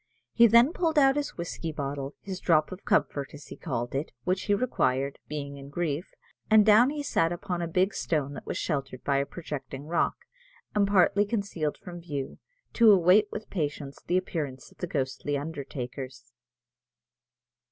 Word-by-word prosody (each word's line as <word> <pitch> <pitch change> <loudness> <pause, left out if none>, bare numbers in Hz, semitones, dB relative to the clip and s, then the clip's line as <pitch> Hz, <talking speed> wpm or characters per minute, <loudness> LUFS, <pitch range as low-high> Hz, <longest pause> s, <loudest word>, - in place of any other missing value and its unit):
He 235 0 +7
then 235 +7 +6
pulled 330 -3 0
out 270 -2 +6
his 290 -1 -3
whiskey 170 -1 -4
bottle, 140 -1 -4
his 190 -2 -5
drop 155 -2 +2
of 185 +1 -9
comfort, 140 0 0
as 145 - -11
he - - -9
called 120 -6 -4
it, 140 +4 -2
which 185 +1 -1
he 205 - +3
required, 140 - 0
being 140 -1 -5
in 140 0 -10
grief; 165 +1 -3 0.3
and 215 -1 +7
down 220 +4 +7
he 295 0 -3
sat 165 -11 +1
upon 175 0 -3
a 170 - -1
big 185 +4 +1
stone 145 -4 -1
that - - -9
was - - -2
sheltered 135 -5 -3
by 140 -1 +1
a 140 0 0
projecting 145 -4 -7
rock, 165 +2 +1 0.6
and 205 -1 +3
partly 200 +1 +4
concealed 200 -8 -2
from 175 -1 -9
view, 145 -5 -5 0.3
to 230 -2 +7
await 195 +3 +5
with 215 - -7
patience 145 -5 -3
the 180 - +2
appearance 150 -8 -4
of - - -23
the 180 - -3
ghostly 140 0 -2
undertakers. 135 -4 -6
165 Hz, 175 wpm, -28 LUFS, 140-200 Hz, 0.6 s, He